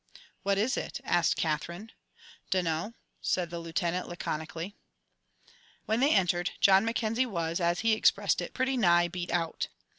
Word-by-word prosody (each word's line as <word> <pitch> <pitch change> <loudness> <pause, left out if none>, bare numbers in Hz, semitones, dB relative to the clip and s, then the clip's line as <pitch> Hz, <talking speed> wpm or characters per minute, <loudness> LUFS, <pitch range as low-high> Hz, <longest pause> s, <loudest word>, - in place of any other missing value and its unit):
"What 200 0 +1
is 225 +6 +1
it?" - - -4
asked 175 -1 +2
Katherine. 170 +7 -3 0.6
"Dunno," 180 +3 -1 0.3
said 175 -2 -1
the 170 - -4
Lieutenant, 170 +2 -2
laconically. 165 +2 -5 1.1
When 220 +2 +1
they 280 +4 +4
entered, 175 -3 +2
John 195 0 +6
Mackenzie 230 +2 0
was, 170 -5 -2
as 170 0 +1
he 225 0 +3
expressed 215 - +3
it, - - -7
"pretty 260 0 0
nigh 175 -5 +4
beat 175 0 -5
out." 165 -2 -1
180 Hz, 145 wpm, -29 LUFS, 170-215 Hz, 1.1 s, John